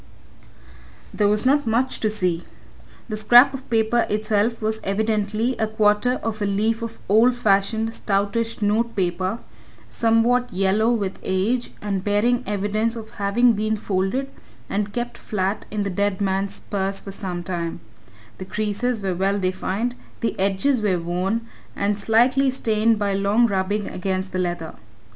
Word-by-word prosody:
There 205 - +2
was 210 +3 +1
not 285 0 +3
much 245 +4 0
to 215 - +1
see. 180 -5 0 0.6
The 215 - -3
scrap 245 +5 +6
of 270 0 -8
paper 230 +1 +2
itself 215 +2 0
was 220 0 0
evidently 215 +3 0
a 220 - 0
quarter 215 +2 +2
of 215 -1 -3
a 205 - +1
leaf 220 +3 0
of 230 0 -6
old 230 +5 +5
fashioned, 220 0 +1
stoutish 210 +3 -1
notepaper, 205 -3 0 0.5
somewhat 235 +2 +2
yellow 195 +4 +2
with 200 -5 -2
age, 215 +7 0
and 195 -3 -2
bearing 215 +5 +2
evidence 210 +3 -1
of 220 -1 -8
having 235 +5 +4
been 215 +1 -1
folded 200 +7 -1 0.4
and 205 +1 -1
kept 240 +1 -4
flat 200 0 -2
in 210 -1 -2
the 200 - -2
dead 200 0 0
man's 195 0 -1
purse 195 -1 -3
for 195 - -8
some 180 -3 -5
time 170 -2 -3 0.6
the 185 - -5
creases 215 +3 -2
were 190 -1 0
well 195 +3 0
defined, 190 +5 -1 0.3
the 230 - -1
edges 200 +7 +1
were 200 -4 +1
worn 180 +6 -1 0.3
and 205 +1 0
slightly 245 +6 +3
stained 225 -3 +1
by 205 -1 0
long 200 +4 +3
rubbing 200 0 -1
against 190 +1 -3
the 185 - -2
leather. 175 -3 -3
210 Hz, 150 wpm, -22 LUFS, 195-230 Hz, 0.6 s, scrap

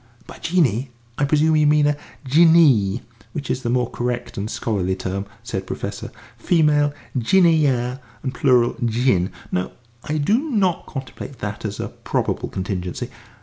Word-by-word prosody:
"By - - -12
genie, 140 - +1 0.3
I 145 - +3
presume 155 +2 +3
you 150 -1 +4
mean 150 0 +4
a 145 0 +2 0.3
Jinnee, 140 - +5 0.3
which 145 - -3
is 130 - -2
the 120 - -2
more 125 0 +1
correct 120 0 -3
and 100 +2 -3
scholarly 95 -6 -1
term," 95 +1 -4 0.2
said - - -3
the - - -17
Professor. - - -5 0.3
"Female, 150 -3 +3 0.2
Jinneeyeh, 135 -3 +3 0.2
and 130 -2 -2
plural 125 -4 +3
Jinn. 115 -6 +2 0.2
No, 90 0 -2 0.3
I 155 +1 -2
do 200 +11 +2
not 195 - +1
contemplate 135 -1 -7
that 105 0 -5
as 105 -1 -4
a - - -3
probable - - -2
contingency. 90 -2 -4
130 Hz, 150 wpm, -21 LUFS, 110-150 Hz, 0.3 s, Jinnee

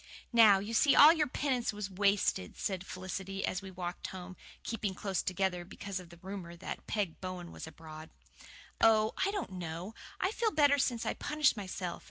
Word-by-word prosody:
"Now 220 -4 +8
you 205 +4 -4
see 275 +5 +5
all 305 +3 +10
your 310 -3 +1
penance 255 -2 -1
was 205 -2 -5
wasted," 195 - +1
said 190 -3 -2
Felicity, 190 +1 -4
as 185 - -2
we 195 - -8
walked 180 -1 -5
home, 185 0 -8 0.3
keeping 210 -4 -3
close 195 -2 -1
together 185 -1 -1
because 195 +1 -6
of 180 -2 -12
the 170 - -14
rumour 185 -3 -7
that 170 - -7
Peg 200 -7 -2
Bowen 185 -2 -6
was - - -8
abroad. 160 -1 -10 0.7
"Oh, 220 -1 +5
I 390 - +2
don't 400 - -3
know. 175 +2 -5 0.3
I 375 - +1
feel 450 0 +1
better 290 -5 +4
since 240 -3 0
I - - 0
punished 300 -3 +2
myself. 185 -3 -5
195 Hz, 185 wpm, -32 LUFS, 180-230 Hz, 0.7 s, all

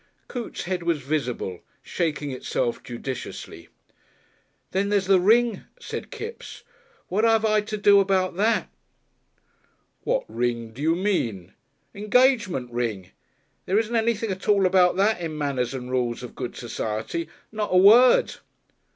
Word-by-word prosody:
Coote's 245 -3 -6
head 180 0 -3
was 170 -2 0
visible, 125 - -3 0.2
shaking 150 -4 -2
itself 125 -2 -2
judiciously. 125 +1 -7 1.0
"Then 195 +2 0
there's 200 -2 +1
the 190 -1 +4
ring," 225 +4 +3
said - - -6
Kipps. 455 +1 -8 0.4
"What 205 +4 0
'ave 225 -1 +3
I 215 0 +3
to 215 +1 -5
do 205 -1 +6
about 190 -2 +1
that?" 220 +3 +1 1.4
"What - - 0
ring 120 -2 -2
do 120 +5 -10
you 160 +2 +2
mean?" 125 - -2 0.4
"'Ngagement 210 - +2
Ring. 110 -6 -3 0.6
There 190 - +2
isn't 225 +1 0
anything 225 -1 0
at 190 +2 -6
all 200 -2 +4
about 180 -1 +4
that 200 0 +2
in 160 -2 -4
'Manners 135 -5 -1
and 125 -1 -6
Rules 125 -1 -1
of 125 - -8
Good 125 -2 -6
Society' 115 +6 -4 0.2
not 215 -1 -3
a 185 - +4
word." 230 +7 +6
185 Hz, 140 wpm, -24 LUFS, 125-215 Hz, 1.4 s, do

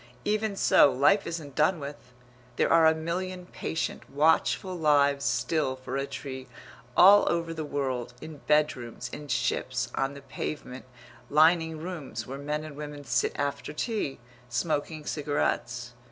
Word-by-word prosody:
Even 215 0 0
so, 145 - +5
life 145 +11 +3
isn't 160 -4 -5
done 155 +5 +2
with; 140 -3 -9 0.4
there - - +2
are 165 -1 +7
a 160 - +4
million 180 +3 -4
patient, 160 -2 -4
watchful 160 +5 +2
lives 145 -3 +3
still 130 +4 0
for 130 0 -6
a 135 0 -1
tree, 130 -2 -7 0.5
all 200 +3 +8
over 170 -1 -1
the 160 -1 -4
world, 130 -4 -3
in 155 +1 -9
bedrooms, 125 -6 +1
in 150 0 -7
ships, 125 0 -1
on 135 +1 -1
the 140 - -11
pavement, 130 -3 -6 0.4
lining 160 +1 +4
rooms, 165 -3 -6
where 135 +2 -7
men 150 +2 -3
and 155 -2 -8
women 145 -1 -7
sit 125 - +1
after 145 +1 -3
tea, 205 - -2 0.3
smoking 150 +3 -2
cigarettes. 125 -4 -2
150 Hz, 145 wpm, -28 LUFS, 135-160 Hz, 0.5 s, all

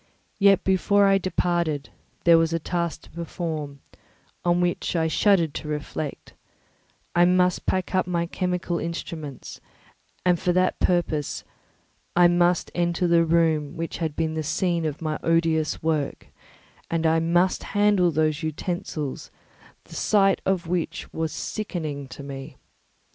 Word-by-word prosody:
Yet, 195 -1 +5
before 200 +2 +3
I 195 0 +4
departed, 170 -6 -1 0.3
there 170 -1 +7
was 165 0 +1
a - - +2
task 170 0 -3
to - - -17
perform, 155 -4 -5 0.6
on 175 0 +2
which 175 0 -1
I 165 -1 +2
shuddered 170 -2 +3
to - - -6
reflect; 150 -1 -5 0.8
I 175 0 +6
must 180 0 +2
pack 185 0 -1
up 185 -1 +2
my 170 -1 0
chemical 180 -1 -2
instruments, 160 -4 -6 0.6
and 180 -2 +3
for 180 - +1
that 185 +1 +1
purpose 165 -5 0 0.7
I 175 0 +7
must 175 0 +2
enter 175 +1 0
the 170 -1 +4
room 160 -3 +1
which 165 0 -4
had 160 -3 -2
been 160 -1 -1
the 160 - -2
scene 170 +2 0
of 155 +1 -4
my 155 -1 -2
odious 165 -2 +1
work, 155 -3 -1 0.6
and 165 -1 -1
I 160 0 +4
must 175 +3 +2 0.2
handle 205 -4 +4
those 155 -1 0
utensils 155 -2 -4 0.5
the - - -15
sight 195 -2 +3
of 190 -3 +1
which 175 0 -3
was 160 -1 -2
sickening 155 -10 -4
to 140 - -10
me. 135 0 -8
170 Hz, 145 wpm, -25 LUFS, 155-180 Hz, 0.8 s, there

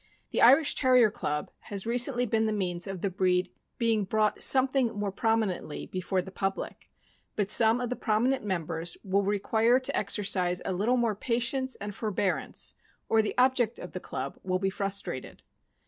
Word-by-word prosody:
The - - 0
Irish 275 +5 +6
Terrier 250 -5 +4
Club 150 -7 -3
has 200 -1 -5
recently 245 +1 +2
been 220 -1 +1
the - - 0
means 180 -3 -2
of 195 -2 -6
the 200 - -1
breed 180 -1 +1 0.3
being 225 -3 +1
brought 215 +2 0
something 260 -2 +3
more 205 -1 -2
prominently 215 - -1
before 185 0 -2
the 190 - -10
public, 195 0 -4 0.5
but 205 -1 0
some 225 +2 +5
of 245 -1 -3
the - - -1
prominent 240 +5 0
members 170 -3 -3
will 200 +1 +1
require 220 +4 +2
to 260 - -1
exercise 190 -3 +1
a - - -1
little 220 +8 +1
more 235 -3 +1
patience 250 +4 -1
and 205 0 -6
forbear 200 -2 -1
ance, - - -4 0.4
or 225 - +4
the 215 - -4
object 250 -2 +2
of 180 - -8
the 185 - -5
club 135 -5 -6
will 185 -1 -1
be 195 +1 -1
frustrated. 195 -9 -4
210 Hz, 175 wpm, -28 LUFS, 190-235 Hz, 0.5 s, Irish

